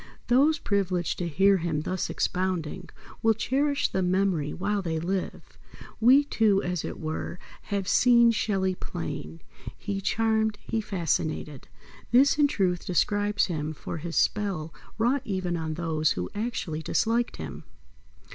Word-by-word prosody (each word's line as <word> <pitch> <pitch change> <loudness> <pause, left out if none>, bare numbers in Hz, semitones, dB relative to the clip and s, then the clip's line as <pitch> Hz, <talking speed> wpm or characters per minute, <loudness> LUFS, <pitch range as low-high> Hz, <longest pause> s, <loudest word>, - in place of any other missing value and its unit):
Those 285 +6 +4
privileged 185 - -1
to 175 - -1
hear 195 +5 +4
him 165 -3 -1
thus 185 +3 -2
expounding 180 -1 -2 0.3
will 225 -1 +3
cherish 280 +6 +1
the 190 - -1
memory 180 -5 +1
while 200 +3 -1
they 165 -3 -2
live. 180 +3 -4 0.4
We, 260 +5 +6
too, 220 -8 +2
as 180 -2 -2
it - - -6
were, 160 +2 -4 0.3
have 200 -2 -2
"seen 235 0 +5
Shelley 195 -4 0
plain." 80 - -6 0.4
He 200 -1 -4
charmed, 220 +1 +1
he 225 - -2
fascinated. 160 -7 -2 0.4
This, 275 +4 +4
in 290 - +6
truth, 185 -9 0
describes 205 +3 +1
him 155 -3 -3
for 165 - -6
his 165 +1 -6
spell 185 -7 0 0.2
wrought 245 +5 +2
even 185 -6 -2
on 160 -2 -3
those 155 -2 0
who 90 0 -4
actually 205 -8 -3
disliked 230 +7 0
him. - - -7
190 Hz, 140 wpm, -27 LUFS, 165-220 Hz, 0.4 s, We